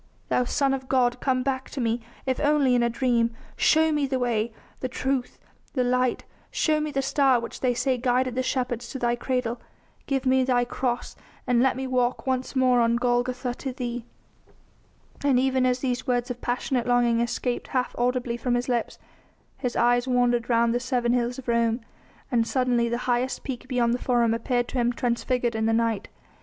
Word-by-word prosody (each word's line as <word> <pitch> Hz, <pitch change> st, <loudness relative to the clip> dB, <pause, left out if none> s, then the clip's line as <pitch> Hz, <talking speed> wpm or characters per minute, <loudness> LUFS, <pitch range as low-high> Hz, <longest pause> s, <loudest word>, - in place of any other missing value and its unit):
Thou 250 Hz, -, +2 dB
Son 275 Hz, +2 st, +1 dB
of 260 Hz, -1 st, -5 dB
God, 250 Hz, -2 st, +2 dB
come 255 Hz, -1 st, 0 dB
back 260 Hz, -1 st, -2 dB
to 280 Hz, -, -6 dB
me, 230 Hz, -1 st, 0 dB, 0.2 s
if 260 Hz, -1 st, -1 dB
only 290 Hz, -3 st, +3 dB
in 245 Hz, -, +3 dB
a 235 Hz, -, +2 dB
dream... 235 Hz, -2 st, +1 dB, 0.2 s
show 320 Hz, 0 st, +4 dB
me 295 Hz, -2 st, +1 dB
the 265 Hz, -1 st, -1 dB
way, 235 Hz, -2 st, 0 dB, 0.3 s
the 255 Hz, -, -3 dB
truth, 260 Hz, 0 st, -2 dB, 0.4 s
the 255 Hz, -, +1 dB
light; 250 Hz, 0 st, +1 dB, 0.3 s
show 310 Hz, -1 st, +1 dB
me 305 Hz, 0 st, -2 dB
the 275 Hz, -2 st, -1 dB
star 270 Hz, -2 st, +3 dB
which 235 Hz, -, -7 dB
they 250 Hz, -2 st, +1 dB
say 255 Hz, 0 st, 0 dB
guided 250 Hz, 0 st, +1 dB
the 255 Hz, -, 0 dB
shepherds 245 Hz, -2 st, -2 dB
to -, -, -5 dB
Thy 240 Hz, -1 st, +1 dB
cradle... 245 Hz, -1 st, -2 dB, 0.5 s
give 270 Hz, -1 st, -1 dB
me 260 Hz, 0 st, +4 dB
Thy 245 Hz, -1 st, +2 dB
cross, 245 Hz, 0 st, -3 dB, 0.3 s
and 245 Hz, -2 st, +3 dB
let 265 Hz, -1 st, +3 dB
me 265 Hz, -, -3 dB
walk 250 Hz, -1 st, 0 dB
once 260 Hz, 0 st, -2 dB
more 255 Hz, -2 st, +4 dB
on 230 Hz, 0 st, +3 dB
Golgotha 245 Hz, +1 st, 0 dB
to 265 Hz, +1 st, -5 dB
Thee." 245 Hz, -2 st, -4 dB, 1.2 s
And 280 Hz, -3 st, +3 dB
even 260 Hz, -1 st, +2 dB
as 250 Hz, 0 st, 0 dB
these 255 Hz, -1 st, -2 dB
words 245 Hz, 0 st, 0 dB
of 245 Hz, -, -7 dB
passionate 245 Hz, 0 st, -1 dB
longing 240 Hz, -1 st, +3 dB
escaped 240 Hz, +1 st, -2 dB
half 255 Hz, -1 st, -1 dB
audibly 245 Hz, -1 st, 0 dB
from 245 Hz, +1 st, 0 dB
his 245 Hz, 0 st, -1 dB
lips 240 Hz, -2 st, -1 dB, 0.6 s
his 250 Hz, -3 st, -2 dB
eyes 245 Hz, +1 st, +3 dB
wandered 245 Hz, -1 st, +2 dB
round 235 Hz, 0 st, +3 dB
the 245 Hz, -, +1 dB
seven 245 Hz, -1 st, 0 dB
hills 245 Hz, 0 st, 0 dB
of 265 Hz, -, -9 dB
Rome, 235 Hz, 0 st, +2 dB, 0.5 s
and 230 Hz, -2 st, +2 dB
suddenly 245 Hz, -2 st, +1 dB
the 235 Hz, -, -1 dB
highest 250 Hz, +1 st, 0 dB
peak 255 Hz, -1 st, -6 dB
beyond 245 Hz, -2 st, +1 dB
the 245 Hz, -, -1 dB
Forum 240 Hz, -3 st, +2 dB
appeared 245 Hz, +1 st, 0 dB
to 260 Hz, -, -2 dB
him 240 Hz, 0 st, +2 dB
transfigured 240 Hz, 0 st, 0 dB
in 220 Hz, 0 st, 0 dB
the 225 Hz, -, +2 dB
night. 225 Hz, -2 st, 0 dB
245 Hz, 195 wpm, -25 LUFS, 240-260 Hz, 1.2 s, show